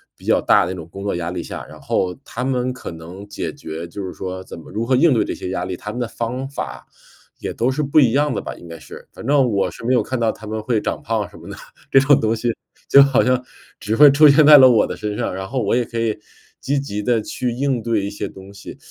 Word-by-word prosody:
比 - - -22
较 - - +2
大 85 - +3
的 - - -4
那 - - -7
种 85 -3 -9
工 100 +3 -9
作 100 - -2
压 85 0 -3
力 90 - -4
下， - - -7
然 - - -14
后 90 -1 -1
他 125 -1 -6
们 130 -1 -1
可 125 - -8
能 85 +5 -10
解 100 - -5
决， 80 +2 -7
就 95 +3 -7
是 90 - -6
说 95 0 -6
怎 - - -10
么 80 - -13
如 110 +2 -2
何 130 - +2
应 140 +1 +4
对 115 - +2
这 - - -3
些 90 - -6
压 95 - -3
力， 95 - -4
他 100 +4 -8
们 125 - -6
的 120 - -1
方 125 +4 -4
法 140 - -7 0.5
也 - - -4
都 120 +3 0
是 150 +3 -2
不 145 +2 +3
一 125 -5 +4
样 145 -2 +1
的 - - -1
吧， - - -6
应 85 - -13
该 85 - -9
是。 75 - -13
反 - - -11
正 135 -2 +3
我 95 -2 0
是 - - -12
没 125 +2 +2
有 120 - +2
看 130 +2 -3
到 115 -1 +2
他 110 - -12
们 110 +1 -4
会 110 0 0
长 - - -3
胖 110 -2 -2
什 - - -14
么 - - -12
的， - - -7 0.3
这 135 - +6
种 140 +1 +4
东 110 +1 +1
西 120 +2 -2 0.4
就 140 - +8
好 135 -3 +3
像， 125 0 +1 0.4
只 110 +1 -2
会 145 +2 +8
出 150 +2 +7
现 145 +1 +6
在 150 0 +10
了 130 -2 +8
我 115 -3 +4
的 - - -6
身 105 -1 -4
上， - - -2
然 95 +1 -5
后 130 0 -2
我 100 - 0
也 120 -1 +1
可 115 - -7
以 115 -2 -1 0.4
积 140 +2 -1
极 105 -7 -4
地 115 +1 +1
去 125 +3 -3
应 130 0 -1
对 110 -3 -1
一 - - -3
些 105 0 -5
东 95 +1 -13
西。 100 - -11
115 Hz, 310 characters per minute, -20 LUFS, 100-130 Hz, 0.5 s, 在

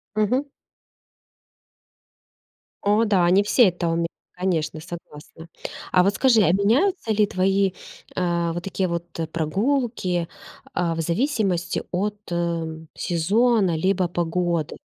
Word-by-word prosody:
Мгм. 215 +6 +2 2.4
О 210 +3 +3
да, 185 -5 +3
не 195 +2 +5
все 215 +1 +5
это 175 -1 -3
умеют. 165 0 0 0.3
Конечно, 170 -4 -1
согласна. 165 -1 -10 0.4
А 180 -1 +5
вот 200 +2 +2
скажи, 245 -5 +4
а 170 -4 +4
меняются 230 - +2
ли 210 0 +3
твои, 195 +1 +2 0.4
э, 170 -2 0
вот 170 +1 -4
такие 190 0 -2
вот 170 0 -3 0.3
прогулки, 185 - 0 0.5
а, 170 -2 0
в 165 - -1
зависимости 185 - 0
от, 205 +3 -1 0.2
э, 165 -2 -2
сезона, 195 +1 +2
либо 185 +1 +1
погоды? 170 -2 -1
180 Hz, 115 wpm, -23 LUFS, 170-205 Hz, 2.4 s, не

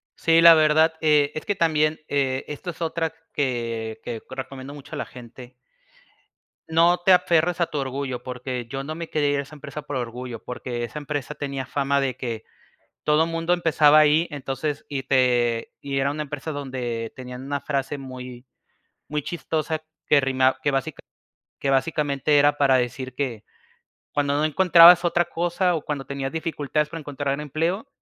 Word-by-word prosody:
Sí, 165 0 +4
la 170 0 +10
verdad, 155 +1 +4
eh, 150 -2 +3
es 155 - -5
que 205 - 0
también, 155 -3 +1
eh, 135 -2 0
esto 150 +5 -6
es 170 - -16
otra 165 0 -1 0.2
que 115 -5 -2
que 115 -2 -5
recomiendo 135 +1 -7
mucho 145 -1 -10
a - - -5
la - - -3
gente 125 +1 -12 1.2
No 170 +2 +4
te 190 - +7
aferres 175 -1 +2
a 170 - +3
tu 150 - -5
orgullo 135 -2 -3
porque 125 -1 -5
yo 135 +3 -5
no 155 +3 -5
me 165 0 -6
quería 145 -2 +1
ir 145 - +1
a 140 - -2
esa 150 +2 -13
empresa 150 +1 -8
por 145 - -6
orgullo, 120 -1 -5
porque 120 -1 -5
esa 120 +6 -5
empresa 145 -1 -4
tenía 140 -2 -4
fama 140 +1 0
de 130 -2 -2
que 115 -3 -4 0.6
todo 150 +2 +3
mundo 165 +1 -1
empezaba 155 -3 +5
ahí, 155 +3 +4
entonces 140 +1 -4
y 140 -2 -3
te 120 -3 +1
y 140 -1 -3
era 140 +1 +1
una 150 +1 -3
empresa 145 +2 -5
donde 125 -5 -4
tenían 125 0 -8
una 140 +1 -3
frase 140 0 -2
muy 130 -1 -9 0.6
muy 150 -1 -3
chistosa 160 -2 -3 0.2
que 145 - +4
rima 130 0 +2
que - - +2
basica 140 +3 -2 0.6
que 140 - -3
básicamente 145 +1 +1
era 145 +1 +4
para 135 -2 +4
decir 130 +1 -3
que 125 -6 -3 0.7
cuando 145 -1 0
no 150 - +2
encontrabas 175 +2 +7
otra 175 0 +2
cosa 175 +2 0
o 160 - -2
cuando 140 -3 -4
tenías 135 -1 -4
dificultades 150 -2 -2
para 165 +1 -6
encontrar 140 -1 -3
empleo, 165 - -2
145 Hz, 175 wpm, -24 LUFS, 130-155 Hz, 1.2 s, la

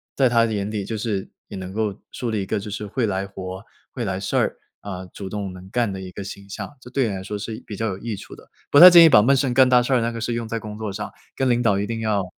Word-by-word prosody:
在 130 -2 +4
他 115 -1 +4
的 110 - -2
眼 100 -1 -2
里 105 -2 -3
就 110 - -4
是 105 -3 -3 0.2
也 100 - -8
能 95 0 -7
够 105 -2 -1 0.2
树 125 - -4
立 110 -3 -1
一 - - -5
个 105 +2 -1
就 100 - -7
是 105 +1 -5
会 115 +3 -1
来 95 -1 -1
活、 95 -1 -8 0.3
会 - - -4
来 - - -2
事 - - -2
儿， - - +1 0.2
啊， 95 -2 -6
主 95 +2 -8
动 100 -1 -4
能 90 +1 -12
干 120 0 0
的 95 - -5
一 95 -1 -7
个 100 - -7
形 100 0 -9
象。 145 +8 -7
这 125 - -13
对 130 -1 +1
你 - - -3
来 95 - -5
说 105 +2 -4
是 110 +2 -6
比 105 - -6
较 110 +2 -2
有 95 -3 -3
益 115 +1 -4
处 - - -11
的， - - -17 0.2
不 145 - +7
太 180 +3 +13
建 170 -1 +9
议 165 - +8
把 105 - +7
闷 135 +6 +4
声 135 -2 +1
干 130 +1 +6
大 125 -1 +5
事 130 - 0
儿 125 - +4
那 115 +1 0
个 115 - -6
事 120 - -1
用 115 -1 -3
在 115 +1 -3
工 105 0 -7
作 110 -2 -4
上， 105 +1 -5 0.2
跟 135 -1 +1
领 120 0 +2
导 105 -5 +2
一 100 - -1
定 115 +1 -4
要 105 -3 0
105 Hz, 340 characters per minute, -22 LUFS, 100-120 Hz, 0.3 s, 太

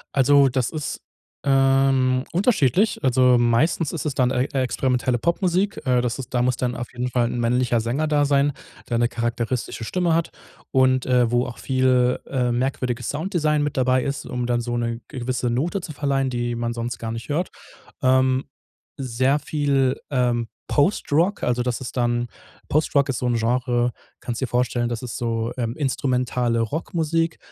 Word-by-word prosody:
Also 140 +1 +5
das 130 -1 0
ist, 155 -3 -5 0.4
ähm, 135 -1 +3
unterschiedlich. 190 - +2
Also, 125 -1 +4
meistens 120 +7 +2
ist 160 -2 -4
es 150 - -1
dann 130 -1 +2
ex 125 +3 -1
experimentelle 130 -1 0
Popmusik. 180 - 0
Äh, 125 -1 +3
das 120 +1 -2
ist 130 - -8
da 120 - +2
muss 125 0 +2
dann 125 -1 -2
auf 120 - -6
jeden 125 +1 -2
Fall 120 -1 +1
'n 120 - -4
männlicher 120 0 +1
Sänger 135 +7 -1
da 145 -1 +2
sein, 140 0 +2 0.3
der 120 - -1
eine 120 0 +2
charakteristische 120 0 -3
Stimme 175 +6 0
hat 165 0 0 0.4
und, 130 -1 +3
äh, 125 -2 +3
wo 120 +1 +2
auch 120 - -8
viel, 130 -1 +2
äh, 125 -3 0
merkwürdiges 125 -1 -2
Sounddesign 155 -1 0
mit 150 - -2
dabei 130 0 +2
ist, 140 0 -3
um 125 -1 -3
dann 120 0 0
so 120 0 -3
'ne 115 0 -2
gewisse 125 -2 -2
Note 165 +11 -1
zu 165 - -7
verleihen, 135 -2 0
die 120 -1 -2
man 120 0 -2
sonst 120 +1 -4
gar 115 -1 -4
nicht 115 +1 -6
hört. 170 +5 -1 0.5
Ähm, 130 0 +3 0.5
sehr 130 +2 +1
viel, 140 -4 0
ähm, 120 -3 +1 0.2
Postrock, 170 +3 +1
also 125 0 +1
das 125 0 -2
ist 130 - -7
dann 120 0 0 0.4
Postrock 140 -2 +2
ist 125 - -1
so 125 - -1
'n 120 - +1
Genre, 120 +1 +1 0.3
kannst 120 -1 -4
dir 130 - 0
vorstellen, 120 -1 0
das 120 +1 -4
ist 120 - -5
so, 115 -1 -2
ähm, 115 -1 -2
instrumentale 125 -4 0
Rockmusik, 165 +5 -1
130 Hz, 175 wpm, -23 LUFS, 120-140 Hz, 0.5 s, Also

